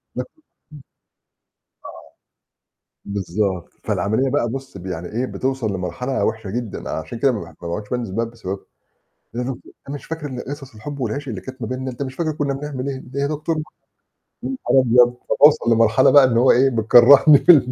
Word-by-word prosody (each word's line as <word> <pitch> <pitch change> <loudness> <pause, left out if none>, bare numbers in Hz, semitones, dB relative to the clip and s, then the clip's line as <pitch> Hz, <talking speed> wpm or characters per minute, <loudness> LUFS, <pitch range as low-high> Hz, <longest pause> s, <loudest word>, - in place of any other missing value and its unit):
آه. - - -2 2.8
بالضبط. 95 -2 -2
فالعملية 110 +7 0
بقى 130 -3 0
بُص 135 -3 -7
ب 90 - -11
يعني 90 -2 -5
إيه؟ 120 +4 -2
بتوصل 130 -5 -2
لمرحلة 95 +9 -2
وحشة 110 -2 -3
جدًا. 115 0 -5
عشان 120 - -5
كده 135 +2 +3
ما 110 - -4
باح 85 -2 -11
ما 85 - -6
باعُدش 105 +5 -5
بانزل 120 -5 -3
البلد 115 +2 -1
بسببها. 100 -4 -5 0.8
"يا 125 - -2
دُكت 130 0 -4 0.3
أنت 140 - -5
مش - - -10
فاكر 160 -2 -5
ال 125 -3 -7
قصص 135 -3 -8
الحب 140 +6 -8
والعشق 130 +4 -3
اللي 105 -5 -5
كانت 130 -1 -10
ما 115 - -3
بينّا؟ 130 +1 -4
أنت 125 +3 -5
مش 130 -1 -7
فاكر 160 -2 -1
كُنّا 145 -2 -2
بنعمل 140 -1 -5
إيه؟ 135 - -3 0.2
إيه 140 - -1
يا 140 - +1
دكتور 155 +2 -2
مح"، - - -3 1.1
يانهار 130 - +5
أبيض! 120 +1 +5
فباوصل 145 -5 +5
لمرحلة 115 +3 +4
بقى 145 -2 +8
إن 120 -3 +1
هو 125 +2 +5
إيه 135 +2 +4
بتكرّهني 125 +5 +7
في 175 - +6
البلد. 130 -6 +4
125 Hz, 185 wpm, -20 LUFS, 110-135 Hz, 2.8 s, بقى